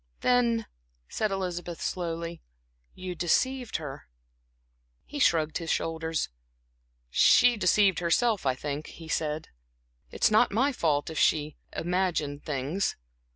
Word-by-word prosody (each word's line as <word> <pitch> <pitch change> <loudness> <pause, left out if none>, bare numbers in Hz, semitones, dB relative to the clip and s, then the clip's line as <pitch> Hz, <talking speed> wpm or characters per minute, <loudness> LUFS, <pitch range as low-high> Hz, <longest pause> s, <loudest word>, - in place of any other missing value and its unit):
"Then," 235 -2 +2 0.4
said 215 - -1
Elizabeth, 175 -3 -4
slowly 170 -1 -3 0.5
"you 185 -1 -5
deceived 245 +9 0
her." 140 - -5 1.0
He 290 - -7
shrugged 160 - +2
his 165 -1 -6
shoulders. 160 -1 -1 0.8
"She 245 - +6
deceived 200 -1 +3
herself, 200 +5 +2
I 130 -2 +1
think," 145 +3 -4
he 165 - -11
said. 155 -1 -2 0.6
"It's - - +2
not 220 +3 +4
my 260 +8 +2
fault 155 - 0
if 160 - -3
she 150 -1 +2 0.2
imagined 170 -5 -1
things. 150 +7 -1
170 Hz, 115 wpm, -28 LUFS, 155-210 Hz, 1.0 s, She